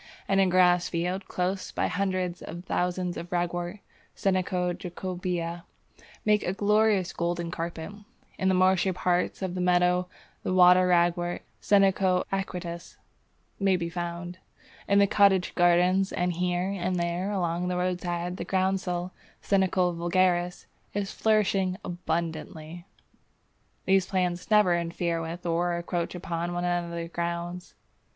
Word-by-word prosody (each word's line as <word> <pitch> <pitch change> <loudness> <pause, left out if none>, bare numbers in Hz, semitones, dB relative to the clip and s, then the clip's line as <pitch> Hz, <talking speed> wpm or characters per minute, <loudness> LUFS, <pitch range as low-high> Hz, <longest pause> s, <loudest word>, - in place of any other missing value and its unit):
In 195 0 +2
a 195 - +5
grass 180 -1 +4
field 180 +3 -2
close 185 +1 -2
by - - -1
hundreds 185 -2 -1
of 170 +2 -8
thousands 180 0 -1
of 170 +1 -7
Ragwort 175 +2 -2 0.3
(Senecio 185 -2 0
jacobæa) 175 -1 -4 0.6
make 210 -1 +4
a 180 - -2
glorious 210 -2 +2
golden 170 0 -2
carpet; 165 0 -5 0.5
in 190 - +1
the 190 - +3
marshy 185 0 +3
part 180 +1 0
of 185 -2 -2
the 180 - -3
meadow 180 0 +3 0.3
the 185 - -1
Water 180 0 +7
Ragwort 175 0 +1 0.2
(Senecio 195 -2 +3
aquaticus) 180 -3 -4 0.6
may 195 -2 +3
be 170 -1 -3
found. 175 +1 -5 0.5
In 200 - +3
the 200 - +6
cottage 195 -2 +3
gardens 180 +2 +3
and 180 0 0
here 180 +2 -1
and 185 -1 -2
there 175 +2 -1
along 175 -2 -1
the 180 0 -1
roadside 180 0 -2
the - - -4
groundsel 185 -1 -1 0.3
(Senecio 185 -2 +2
vulgaris) 175 +1 +1 0.3
is 200 -1 -2
flourishing 195 -4 +1
abundantly. 165 0 -4 1.0
These 190 -1 +3
plants 180 -2 -1
never 210 -5 +5
interfere 170 0 -1
with 165 +2 -6
or 175 +1 +1
encroach 170 0 -3
upon 170 0 -3
one 175 0 -2
another's 170 -1 -2
grounds. 170 +1 -4
180 Hz, 130 wpm, -27 LUFS, 175-185 Hz, 1.0 s, Water